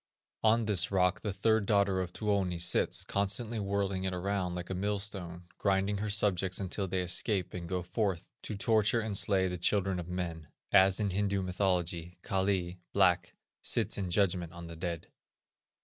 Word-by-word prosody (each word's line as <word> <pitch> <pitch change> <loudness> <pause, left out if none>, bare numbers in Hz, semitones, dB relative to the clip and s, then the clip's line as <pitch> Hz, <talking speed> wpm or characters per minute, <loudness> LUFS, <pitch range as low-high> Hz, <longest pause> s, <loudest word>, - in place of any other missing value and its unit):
On 115 +1 +3
this 100 -3 +3
rock 90 -2 +2
the 105 - -2
third 110 +1 +1
daughter 100 -3 +2
of 90 -1 -4
Tuoni 100 -4 0
sits, 85 0 +1
constantly 105 +3 -1
whirling 100 -1 -1
it 95 -1 -2
round 90 -1 -2
like 90 +1 -5
a - - 0
millstone, 95 -3 -3 0.2
grinding 100 0 +1
her 105 +2 -3
subjects 95 -3 +1
until 95 0 -1
they 95 0 -1
escape 90 +1 +1
and 85 -2 -6
go 90 -1 -2
forth 95 -1 -1 0.2
to 110 - -5
torture 110 +2 +2
and 110 -2 -3
slay 95 -1 +3
the 90 -1 -4
children 95 0 +1
of 85 - -6
men; 85 -3 -4 0.2
as 95 0 +5
in 105 -2 0
Hindu 100 0 0
mythology, 90 -2 -1
Kali 95 -2 -1
(black) 95 -3 +3 0.3
sits - - +1
in 95 -3 -2
judgment 90 -2 +1
on 85 0 -9
the 85 0 -8
dead. 85 -1 -4
95 Hz, 170 wpm, -31 LUFS, 90-100 Hz, 0.3 s, as